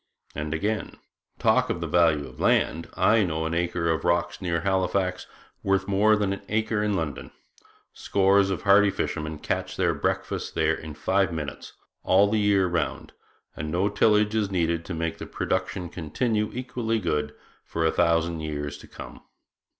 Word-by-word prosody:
And, 75 +1 -4
again: 105 +7 -2 0.4
'Talk - - +2
of - - -1
the - - -3
value 80 -4 +2
of - - -14
land, 80 +2 +1
I 115 +1 +4
know 80 -4 -1
an 80 - -2
acre 85 -1 0
of 80 - -1
rocks 85 +1 0
near 85 -3 -1
Halifax 95 -1 0 0.3
worth 95 0 +1
more 105 +2 +4
than 100 -2 0
an 100 - -6
acre 110 0 0
in 105 -1 0
London. 80 -6 -4 0.6
Scores 100 0 +3
of 95 - -3
hardy 100 0 +6
fishermen 80 -4 -3
catch - - -3
their - - +2
breakfasts - - -2
there 80 0 +1
in 80 -2 -7
five 95 +3 +1
minutes, 75 -4 -6 0.3
all 95 +2 +4
the 110 - +2
year 100 -2 +3
round, 85 -5 -2 0.4
and 75 +1 -4
no 95 +5 +1
tillage 105 0 +3
is 110 -3 0
needed 85 -3 0
to 90 - -5
make 85 0 -3
the - - -6
production 90 -2 -2
continue 105 - -1
equally 120 -2 -2
good 75 -6 -2 0.3
for 80 -1 -2
a 80 - +3
thousand 85 -1 +1
years 75 -2 -4
to - - -13
come.' - - -10
90 Hz, 170 wpm, -26 LUFS, 80-100 Hz, 0.6 s, hardy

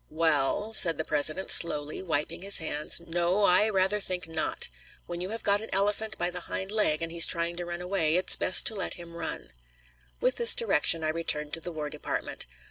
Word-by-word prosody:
"Well," 160 +6 -1
said 165 -6 +6
the 160 - -4
President 155 +5 +1
slowly, 150 -3 +4
wiping 160 -3 -3
his 200 +1 +5
hands, 150 -1 -1
"no, 175 +4 -1
I 200 +3 +4
rather 195 +1 0
think 180 -2 -3
not. 160 -1 -2 0.4
When 175 0 -7
you 185 - -4
have 225 +2 -7
got 205 0 +1
an 220 - -8
elephant 205 +2 -2
by 175 +1 -2
the 180 - -5
hind 190 +1 -3
leg, 170 -7 +1
and 165 - -5
he's 170 0 +6
trying 170 0 -1
to 175 - -5
run 175 0 -6
away, 180 -4 0
it's 180 +1 +5
best 185 - +2
to - - +2
let 195 - -3
him 170 -1 -12
run." 160 - -6 0.7
With 255 - 0
this 470 - +4
direction, 165 - +1
I 155 - -1
returned 150 -2 -2
to 165 - -4
the 175 - -7
War 155 -2 -5
Department. 150 - -6
175 Hz, 210 wpm, -27 LUFS, 160-195 Hz, 0.7 s, said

